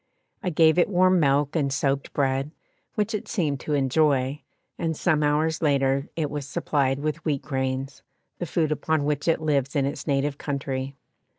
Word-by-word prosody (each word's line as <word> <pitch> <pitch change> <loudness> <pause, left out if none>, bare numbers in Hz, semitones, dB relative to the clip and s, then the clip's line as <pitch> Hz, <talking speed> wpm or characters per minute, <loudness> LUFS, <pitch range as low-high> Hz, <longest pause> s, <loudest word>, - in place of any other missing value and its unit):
I 190 - -1
gave 160 0 +4
it 175 - +3
warm 185 -1 +4
milk 145 0 +2
and 140 -4 +1
soaked 140 0 0
bread, 135 0 0 0.5
which 215 0 0
it 210 - -3
seemed 155 - -1
to 150 +3 -2
enjoy, 140 0 +2 0.4
and 160 -2 -1
some 155 -4 +2
hours 150 +2 +1
later 140 -2 +1
it 155 -3 -2
was 145 -2 -4
supplied 135 -1 0
with 155 +2 -3
wheat 145 -4 -1
grains, 130 0 -3 0.4
the 175 - -3
food 155 -1 0
upon 155 0 0
which 145 +1 -1
it 165 - +3
lives 140 -2 0
in 140 -2 +2
its 140 - -4
native 140 0 0
country. 135 -1 -3
145 Hz, 175 wpm, -25 LUFS, 135-160 Hz, 0.5 s, gave